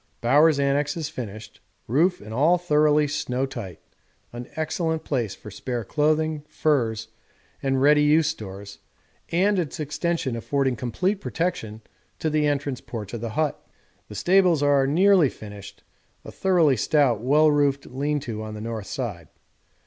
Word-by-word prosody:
Bowers' 145 +5 +4
annexe 140 +2 +1
is 155 -3 -3
finished, 110 -7 -8 0.3
roof 165 - +1
and 105 +2 -9
all 155 +9 +4
thoroughly 150 -3 +3
snow 140 -3 -2
tight; 110 -11 -8 0.5
an 120 0 -7
excellent 160 0 -2
place 120 -11 -2
for 105 - -11
spare 120 +3 -4
clothing, 155 +2 0
furs, 120 -8 0 0.5
and 135 -1 0
ready 150 +1 +5
use 150 +2 +4
stores, 100 -9 -7 0.5
and 190 +3 +2
its 160 -2 -4
extension 155 -3 -2
affording 135 +2 0
complete 180 - -2
protection 115 - -3 0.3
to 160 - -2
the 150 -1 +2
entrance 140 -3 -2
porch 110 -5 -7
of 115 - -5
the 115 - -3
hut. 155 -2 -1 0.5
The 105 - -9
stables 175 - +3
are 140 -2 +3
nearly 180 0 +4
finished 100 -2 -11 0.4
a - - -8
thoroughly 170 -8 +2
stout 125 -2 +2
well 150 +5 +4
roofed 140 -1 +1
lean 145 +3 -2
to 115 -5 -5
on 110 0 -6
the - - -7
north 110 -3 -5
side. 100 - -5
145 Hz, 150 wpm, -24 LUFS, 115-155 Hz, 0.5 s, ready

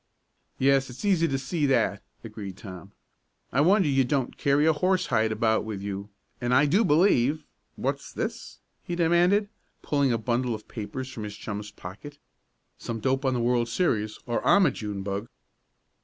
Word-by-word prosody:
"Yes, 135 0 +3
it's 125 - -8
easy 180 -5 +3
to 135 - -1
see 145 +3 -1
that," 115 -6 +1 0.2
agreed 105 -4 -8
Tom. 95 -1 -10 0.6
"I 135 - +3
wonder 190 +2 +4
you 135 -2 +3
don't 130 0 -1
carry 140 +2 +2
a 160 - +5
horsehide 145 -10 +1
about 110 0 +1
with 110 -2 -5
you, 100 0 -5 0.3
and 120 +1 +1
I 145 +3 +5
do 190 +10 +3
believe 150 - +3 0.3
what's - - -3
this?" - - -5 0.3
he 175 - -4
demanded, 175 +4 +3 0.4
pulling 140 -3 +1
a 115 - +2
bundle 120 +1 -1
of 105 - -11
papers 125 +4 -6
from 115 - -7
his 105 -1 -6
chum's 105 -1 -6
pocket. 105 +11 -10 0.6
"Some 115 -1 -4
dope 135 +4 0
on 130 -1 +2
the - - 0
world 120 0 +1
series, 110 -7 0
or 120 -1 -2
I'm 200 -2 +5
a - - +3
June 105 -3 -5
bug!" 100 +3 -3
125 Hz, 170 wpm, -26 LUFS, 110-150 Hz, 0.6 s, a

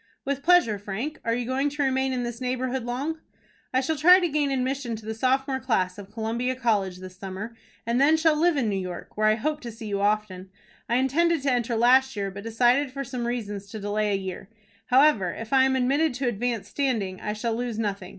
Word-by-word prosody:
"With 280 0 -2
pleasure, 300 - +4
Frank. 220 +11 -5
Are 230 0 0
you 245 0 -2
going 265 +3 0
to 290 0 -2
remain 265 0 +1
in 250 -1 -1
this 240 0 -5
neighborhood 255 0 -2
long?" 280 +7 -3 0.5
"I 260 - +2
shall 315 +4 -1
try 360 +6 +7
to 355 - +1
gain 290 -1 +1
admission 260 -2 -1
to 215 -1 -11
the 220 - -3
sophomore 265 +3 0
class 205 -7 -1
of 200 -1 -10
Columbia 230 +3 -2
College 205 -7 0
this 185 0 -10
summer, 195 +4 -7 0.3
and 235 +2 +1 0.2
shall 320 -1 +4
then 300 - -1
live 345 -2 +3
in 250 -5 +1
New 200 -2 0
York, 180 -2 -7
where 215 0 +2
I 215 - +4
hope 300 +6 -2
to 235 - -6
see 225 0 -10
you 200 -1 -2
often. 205 -3 -1 0.4
I 235 - +2
intended 300 +5 +2
to 275 - +2
enter 240 -1 0
last 260 +3 +4
year, 200 -1 -2
but 200 +1 -8
decided 245 +5 +2
for 275 +1 -4
some 245 -2 -4
reasons 205 -5 -4
to 220 - -7
delay 210 +1 -1
a - - +2
year. 190 0 -7 0.4
However, 250 - +4
if 225 +3 -6
I 265 -1 +6
am 265 0 +2
admitted 270 +3 +1
to 255 0 -2
advanced 235 -1 -2
standing, 220 -10 -1
I 210 - -2
shall 225 +2 -2
lose 235 -1 -3
nothing. 200 -4 -3
240 Hz, 225 wpm, -25 LUFS, 210-265 Hz, 0.5 s, try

